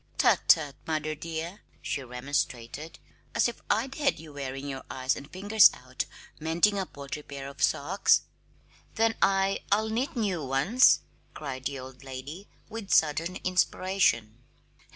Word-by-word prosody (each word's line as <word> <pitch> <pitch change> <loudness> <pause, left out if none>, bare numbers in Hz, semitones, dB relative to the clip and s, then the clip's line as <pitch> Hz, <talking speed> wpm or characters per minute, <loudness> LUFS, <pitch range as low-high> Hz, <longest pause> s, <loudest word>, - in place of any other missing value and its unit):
"Tut, - - +5
tut, 145 -3 +5
mother, 155 -1 -1
dear!" 165 +5 -5 0.2
she 140 - -3
remonstrated. 130 +2 -3 0.4
"As - - +4
if 240 - -6
I'd 255 +5 +1
have 285 -2 +2
you 155 -2 -11
wearing 135 0 -5
your 135 -2 -5
eyes 130 +1 0
and 140 - -9
fingers 205 +3 +6
out 130 0 -5 0.3
mending 170 +6 +2
a 190 - -2
paltry 140 +1 -7
pair 140 -2 -8
of 140 0 -10
socks!" 170 +7 +3 0.7
"Then 225 0 +3
I 195 0 +3
I'll 215 +2 +3
knit 245 +6 -1
new 195 -9 -1
ones!" 140 - +4 0.3
cried 130 -3 -6
the 140 0 -2
old 130 0 -10
lady, 135 +8 -8 0.2
with 220 -3 -7
sudden 160 +3 +3
inspiration. 180 - +1
155 Hz, 145 wpm, -28 LUFS, 135-195 Hz, 0.7 s, fingers